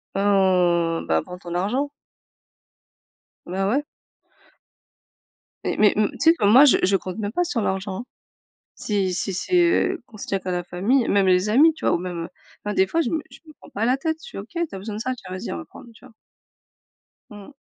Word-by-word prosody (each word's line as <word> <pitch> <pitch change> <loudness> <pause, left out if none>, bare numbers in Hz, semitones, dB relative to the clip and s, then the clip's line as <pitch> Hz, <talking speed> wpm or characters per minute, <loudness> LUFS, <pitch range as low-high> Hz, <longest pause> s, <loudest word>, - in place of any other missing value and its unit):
Mmh, 180 -4 +2
bah, 80 0 +2
prends 180 0 -9
ton 175 -1 -7
argent. 250 +11 0 1.6
Bah, 190 +2 -1
ouais. 275 +7 +1 1.8
Mais - - -1
mais 210 -1 +5
m 210 -1 +2
tu - - -12
sais 325 0 +6
que 325 - -5
moi, 245 +8 +8
je 280 - +5
je 195 +1 +3
compte 185 +1 -7
même 205 -1 -3
pas 355 +7 0
sur 280 -10 -2
l'argent, 190 0 -2
hein. 245 - -11 0.7
Si 195 -3 -1
si 190 +2 -2
c'est, 360 - -2
heu, 360 +1 +1
qu'on 215 - -15
se - - -8
tient 195 - -1
qu'à 185 0 -5
la 180 0 -1
famille, 215 +9 +1
même 200 -1 +3
les 185 +2 +3
amis, 300 +9 +5
tu - - -8
vois, - - +3
ou - - +2
même, 175 -1 -5
heu - - -11 0.4
ben 210 - -2
des 190 - +3
fois 330 - -1
je - - +1
me 320 - -1
je - - -14
me 310 - -14
prends - - -17
pas 215 +3 -2
la 250 - +3
tête, 320 +4 -2
je - - -11
fais: - - -9
«OK, 200 +3 -8
tu 340 - -3
as - - -5
besoin 205 +2 -6
de 215 - -5
ça? 255 +3 -2
Tiens, 185 -6 -12
vas-y, 185 - -5
on - - -4
va 80 - -6
prendre». - - -14
Tu - - -20
vois? 255 - -17 1.2
Mmh 205 -1 -11
mh. - - -15
205 Hz, 230 wpm, -23 LUFS, 185-260 Hz, 1.8 s, moi